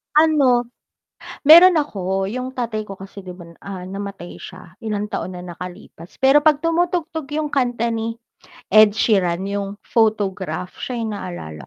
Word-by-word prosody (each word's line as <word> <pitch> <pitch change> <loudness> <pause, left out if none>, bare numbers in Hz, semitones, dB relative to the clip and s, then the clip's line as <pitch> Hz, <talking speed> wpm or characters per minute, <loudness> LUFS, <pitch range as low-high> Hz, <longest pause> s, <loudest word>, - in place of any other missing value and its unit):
Ano, 275 -6 +4 0.7
meron 340 +5 +9
ako, 195 - -1
yung 255 +3 -5
tatay 225 -4 -3
ko 195 - -7
kasi 195 0 -11
'di 180 - -7
ba, 175 -1 -12
ah, 195 -2 -8
namatay 195 -2 -7
siya, 185 0 -12
ilang 210 -1 -3
taon 185 - -4
na 180 - -8
nakalipas, 180 -1 -10
pero 270 +2 +6
'pag 305 -2 +4
tumutugtog 330 -2 -1
yung 305 -1 -2
kanta 245 -4 0
ni 225 0 -3 0.6
Ed 215 -1 +6
Sheeran 190 -4 +1
yung 200 0 -4
photograph 205 -5 -1
siya 250 - -4
yung 225 -2 -3
naaalala 80 - -7
215 Hz, 150 wpm, -20 LUFS, 190-260 Hz, 0.7 s, meron